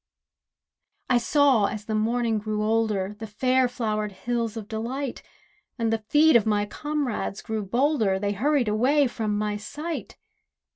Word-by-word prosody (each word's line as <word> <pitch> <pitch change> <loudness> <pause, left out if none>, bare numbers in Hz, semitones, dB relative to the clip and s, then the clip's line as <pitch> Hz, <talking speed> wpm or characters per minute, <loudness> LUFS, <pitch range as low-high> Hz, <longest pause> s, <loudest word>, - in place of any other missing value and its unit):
I 245 - +5
saw, 265 -4 +3
as 210 0 -6
the 220 - -3
morning 225 +1 +1
grew 210 0 -2
older, 215 -3 0
The 220 - -6
fair 255 +4 +2
flowered 215 -4 -2
hills 230 +3 -3
of 215 -2 -6
delight; 240 +5 -4 0.6
And 225 -2 0
the 225 - 0
feet 295 +7 +4
of 225 -2 +4
my 205 -1 +2
comrades 280 -3 -3
grew 220 -1 -3
bolder, 230 -1 +1
They 200 +1 -1
hurried 260 +4 +1
away 260 +8 +3
from 220 -4 -2
my 210 0 -1
sight. 305 +10 -6
225 Hz, 150 wpm, -25 LUFS, 210-255 Hz, 0.6 s, I